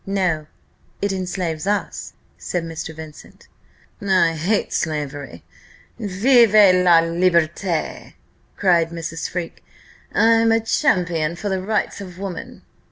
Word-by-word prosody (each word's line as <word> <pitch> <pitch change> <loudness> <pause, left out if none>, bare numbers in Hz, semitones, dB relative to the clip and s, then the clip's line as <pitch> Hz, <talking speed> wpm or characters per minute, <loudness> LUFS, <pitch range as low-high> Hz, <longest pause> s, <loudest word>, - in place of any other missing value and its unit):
"No; 180 -6 -1 0.5
it 200 0 -1
enslaves 180 -3 -3
us," 205 0 -2 0.2
said 175 -2 -4
Mr. 160 -1 -6
Vincent. 155 -1 -12 0.5
"I 185 -4 +3
hate 180 +7 -1
slavery! 145 - -4 0.6
Vive 225 +3 +4 0.2
la 180 -2 +5
liberté!" 170 0 0 0.4
cried 170 -4 +3
Mrs. 165 -1 -5
Freke. 175 -2 -6 0.5
"I'm 225 0 +4
a 225 - +4
champion 170 -7 0
for 205 +4 -4
the 190 -1 -1
Rights 210 +1 -2
of 180 -3 -10
Woman." 195 -2 -7
180 Hz, 110 wpm, -21 LUFS, 165-200 Hz, 0.6 s, la